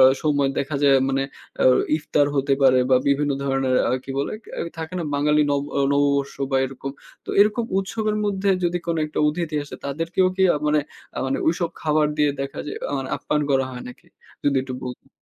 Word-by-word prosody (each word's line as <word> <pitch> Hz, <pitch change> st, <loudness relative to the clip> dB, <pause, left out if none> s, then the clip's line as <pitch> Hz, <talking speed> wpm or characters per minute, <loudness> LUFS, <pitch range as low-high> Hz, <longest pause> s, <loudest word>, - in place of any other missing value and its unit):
অ -, -, +9 dB, 0.2 s
সময় 145 Hz, -3 st, +2 dB
আ -, -, -12 dB
দেখা 140 Hz, +1 st, -2 dB
যায় 140 Hz, -1 st, +6 dB
মানে 135 Hz, 0 st, +1 dB, 0.4 s
আ -, -, +3 dB, 0.3 s
ইফতার 150 Hz, -1 st, +1 dB
হতে 135 Hz, 0 st, +1 dB
পারে 130 Hz, -1 st, +6 dB
বা 130 Hz, -, +7 dB
বিভিন্ন 145 Hz, +1 st, +2 dB
ধরনের 135 Hz, -2 st, +1 dB
আ -, -, +1 dB
কি -, -, -7 dB
বলে? 140 Hz, -, -1 dB
কে -, -, -14 dB, 0.3 s
থাকে 160 Hz, +2 st, -5 dB
না 170 Hz, -, -2 dB
বাঙালি 150 Hz, +1 st, +3 dB
নব 140 Hz, -1 st, +1 dB, 0.3 s
নববর্ষ 140 Hz, -1 st, +1 dB, 0.2 s
বা 135 Hz, -, +2 dB
এরকম। 135 Hz, +1 st, -6 dB, 0.3 s
তো -, -, -5 dB
এরকম 215 Hz, +3 st, +3 dB
উৎসবের 215 Hz, +2 st, -1 dB
মধ্যে 200 Hz, -1 st, 0 dB
যদি 175 Hz, +1 st, +1 dB
কোন 165 Hz, -1 st, 0 dB
একটা 150 Hz, -, -5 dB
অতিথি 155 Hz, 0 st, -2 dB
আসে, -, -, -10 dB
তাদেরকেও 165 Hz, +6 st, 0 dB
কি 190 Hz, -, +2 dB
আ -, -, 0 dB
মানে 150 Hz, 0 st, +3 dB, 0.4 s
আ -, -, -2 dB
মানে 135 Hz, -, -1 dB
ঐসব 170 Hz, 0 st, 0 dB
খাবার 155 Hz, -1 st, +2 dB
দিয়ে 150 Hz, -1 st, +3 dB
দেখা 135 Hz, 0 st, -4 dB
যায় -, -, -5 dB
আ -, -, -4 dB
মানে 130 Hz, -, -4 dB
আপ্যায়ন 150 Hz, 0 st, -1 dB
করা 135 Hz, -1 st, +3 dB
হয় 125 Hz, -1 st, -7 dB
নাকি? 125 Hz, -, -13 dB, 0.4 s
যদি 140 Hz, -1 st, +2 dB
একটু 130 Hz, -1 st, -6 dB
বলতেন। 125 Hz, +2 st, -8 dB
145 Hz, 210 wpm, -23 LUFS, 135-165 Hz, 0.4 s, অ